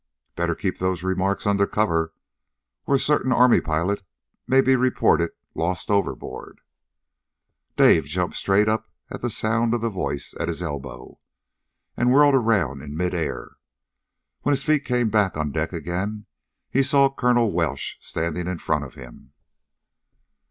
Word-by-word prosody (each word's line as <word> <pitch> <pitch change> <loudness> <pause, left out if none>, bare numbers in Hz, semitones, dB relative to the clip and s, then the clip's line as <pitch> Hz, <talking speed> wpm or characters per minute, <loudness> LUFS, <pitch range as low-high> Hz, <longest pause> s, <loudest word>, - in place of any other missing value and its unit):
"Better 85 -1 -1
keep 95 -2 -3
those 95 -1 -1
remarks 95 +1 -1
under 100 -1 +2
cover, 80 -6 0 0.8
or 140 - +3
a - - +3
certain 145 -3 +2
Army 125 0 +5
pilot 85 +6 -1 0.5
may 130 - +4
be 130 0 +4
reported 125 -9 +2 0.2
lost 90 +3 -2
overboard!" 100 -1 -3 1.2
Dave - - +5
jumped - - -2
straight 100 +2 +2
up 110 +1 -1 0.2
at - - -6
the - - -1
sound 115 +1 0
of 120 - -3
the 115 0 -1
voice 80 -7 -4
at - - -1
his 85 +1 -3
elbow, 70 -6 -7 0.8
and 125 +1 +2
whirled 145 +1 +6
around 100 - +1
in 75 +1 -8
midair. 90 -1 -3 0.8
When 145 - +2
his 135 0 0
feet 155 -2 +1
came 125 -3 +1
back 100 -5 +1
on 75 -1 -2
deck 80 +2 -2
again 95 +5 -4 0.5
he 135 - +3
saw 140 0 +3
Colonel 120 -4 +2
Welsh 80 -5 -2
standing 85 +1 -3
in 90 -1 -3
front 75 -2 -1
of 70 - -10
him. 65 +1 -13
95 Hz, 150 wpm, -23 LUFS, 85-120 Hz, 1.2 s, whirled